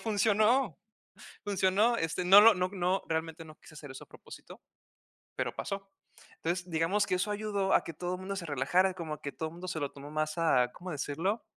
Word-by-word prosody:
funcionó, 220 +3 +2 0.7
funcionó. 205 +4 +2
Este, 165 +1 -2
no 195 +3 +9
lo 225 0 +8
no 180 0 -1
no 185 0 0
realmente, 160 0 -3
no 155 -1 -14
quise 155 - -16
hacer 145 -2 -10
eso 130 - -9
a - - -37
propósito, - - -13 0.8
pero - - -2
pasó. 195 0 -5 0.5
Entonces, 175 +1 -3
digamos 175 +6 +1
que - - 0
eso 200 +3 -1
ayudó 205 -2 -1
a - - +3
que 165 - -7
todo 180 +3 -4
mundo 195 +1 -5
se 175 -3 -5
relajara, 180 +7 +1
como 165 -4 -5
a 150 - -15
que 145 - -5
todo 160 0 -5
mundo 175 +3 -9
se 155 - -3
lo 140 - -2
tomó 145 +1 -11
más 155 +1 -2
a, 125 -7 +3
¿cómo 180 +6 -9
decirlo? 165 +9 -2
180 Hz, 200 wpm, -30 LUFS, 160-200 Hz, 0.8 s, no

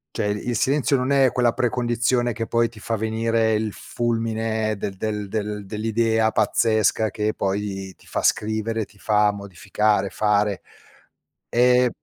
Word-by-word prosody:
Cioè, - - -1
il 105 +4 -2
silenzio 140 +3 +2
non 130 +2 -1
è 135 -2 +4
quella 120 -2 +2
precondizione 120 0 0
che 115 - -3
poi 115 +1 +2
ti 115 - -15
fa 115 +2 -2
venire 110 +1 +1
il 110 0 -1
fulmine 115 -2 -2
del 100 - -4
del 105 0 -3
del 105 0 -3
dell'idea 110 +1 +1
pazzesca 110 -1 +2
che 105 0 -1
poi 95 -1 -3
ti - - -23
fa - - -2
scrivere, 110 +1 0
ti 100 - -22
fa 105 0 +2
modificare, 100 +1 -1
fare, 105 -2 +1 0.9
ehm 125 +1 +4
110 Hz, 145 wpm, -23 LUFS, 105-115 Hz, 0.9 s, è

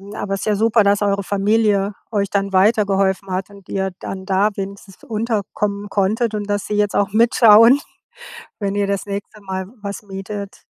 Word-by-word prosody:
Aber 195 -1 -3
es 195 - -6
ist - - -4
ja 215 - +1
super, 220 +1 +3
dass 200 +1 +2
eure 200 -1 +1
Familie 205 0 +1 0.2
euch 200 -2 0
dann 195 -1 -1
weitergeholfen 195 -1 +2
hat 185 +2 -3
und 200 -2 -16
ihr 190 -1 -2
dann 190 -1 -6
da 195 +2 +2
wenigstens 195 0 -8
unterkommen 210 -2 -2
konntet 215 +4 0
und 205 0 -4
dass 205 0 -1
sie 210 - -2
jetzt 205 -1 +1
auch 205 0 +1
mitschauen, 230 +2 +6 0.8
wenn 200 -1 -2
ihr 205 -1 0
das 200 -1 -2
nächste 200 +1 -6
Mal 190 -1 -5
w 205 - -17
was 200 +2 -6
mietet. 200 0 -7
200 Hz, 185 wpm, -19 LUFS, 195-210 Hz, 0.8 s, mitschauen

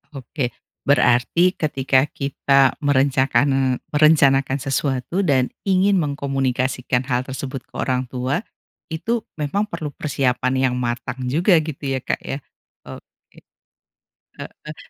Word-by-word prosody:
Oke, 130 0 -3 0.4
berarti 140 +7 +3
ketika 135 -4 +1
kita 140 -1 +2
merencakan 135 -1 +2 0.2
merencanakan 140 -3 +4
sesuatu 135 +5 -1
dan 135 -8 +1 0.2
ingin 195 0 +3
mengkomunikasikan 135 -3 -1
hal 125 -2 0
tersebut 130 0 -5
ke - - -41
orang 130 -1 -1
tua, 130 +6 -2 0.5
itu 215 +9 -2 0.2
memang 200 +9 -1
perlu 160 -5 -5
persiapan 130 -3 0 0.2
yang - - -2
matang 120 +1 -4
juga 175 +8 +3
gitu 155 -2 -7
ya 130 - -1
Kak - - -2
ya? 135 - -3 0.5
Oke, - - -14 1.0
heeh. 150 0 -10
135 Hz, 115 wpm, -21 LUFS, 130-150 Hz, 1.0 s, merencanakan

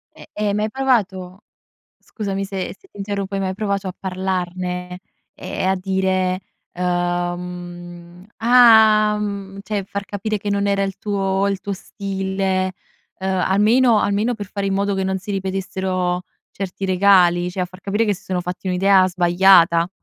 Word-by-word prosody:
Eh, - - -14
e 210 0 -2
hai 200 - +1
mai 210 +1 0
provato 200 -7 -1 0.5
scusami 195 -3 -4
se 195 -1 -4
se 390 - -23
ti - - -21
interrompo. 200 -1 -3
Hai 195 - -1
mai 190 -1 -2
provato 200 -1 -2
a 185 - -6
parlarne 180 -1 -3 0.3
e - - -7
e - - 0
a 190 +1 +3
dire, 185 -1 0 0.3
umh: 175 0 -4
"Ah!" 220 -3 +6
mhmm, 200 -2 -5
cioè, 205 -1 -2
far 200 +1 -5
capire 210 +2 -3
che 205 - -5
non 200 0 0
era 200 0 +1
il 195 0 -3
tuo 195 -1 0
il 195 -1 -2
tuo 200 - -4
stile, 190 -1 -2 0.5
ehm, 190 0 -1
almeno 220 +4 +4
almeno 210 +4 +1
per 205 -2 -7
fare 200 0 -4
in 195 - 0
modo 200 +1 0
che 190 0 -1
non 190 0 -1
si 190 - -9
ripetessero 190 -2 -2 0.3
certi 195 0 -5
regali, 180 -2 +4
cioè 185 - -5
a - - +1
far 185 +1 -15
capire 205 +4 0
che 205 -2 +1
si 195 - -14
sono 185 -1 -2
fatti 180 +2 -5
un'idea 185 +1 +4
sbagliata. 175 -1 +4
190 Hz, 170 wpm, -20 LUFS, 180-200 Hz, 0.5 s, Ah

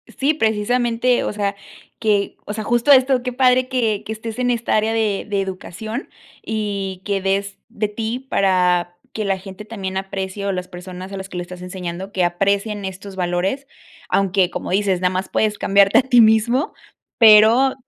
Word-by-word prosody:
Sí, 280 +3 +2
precisamente, 240 0 +1
o - - -3
sea 200 -1 -2 0.4
que 210 -3 0
o 205 - -5
sea, 215 0 -4
justo 240 +5 +2
esto, 260 -2 +5
qué 250 -1 -3
padre 255 0 +3
que 225 -6 0
que - - -5
estés 220 0 -7
en 245 0 +1
esta 235 -1 0
área 215 +1 +1
de 215 -3 0
de 200 -1 0
educación 195 - -6 0.3
y 200 -4 -3
que 200 -1 -1
des 195 +1 -1
de 215 -2 -2
ti 225 +3 -3
para 180 -2 +2 0.2
que 215 - -3
la 195 -1 0
gente 195 +2 -10
también 195 -4 -5
aprecie, 195 +1 -4
o 200 - 0
las 180 -1 -4
personas 180 +1 -9
a 195 - -5
las 190 0 -6
que 185 - -8
lo - - -2
estás 180 0 -9
enseñando, 180 +1 -6
que 185 -2 0
aprecien 200 +3 0
estos 190 +1 -8
valores, 185 +9 -1 0.4
aunque, 190 -2 +2
como - - -5
dices, 190 -1 +1
nada 180 - +3
más 185 +1 -3
puedes 210 -1 0
cambiarte 200 0 +4
a - - +7
ti 245 -2 +5
mismo, 225 +5 +3 0.4
pero 225 +4 +7
205 Hz, 185 wpm, -20 LUFS, 190-225 Hz, 0.4 s, a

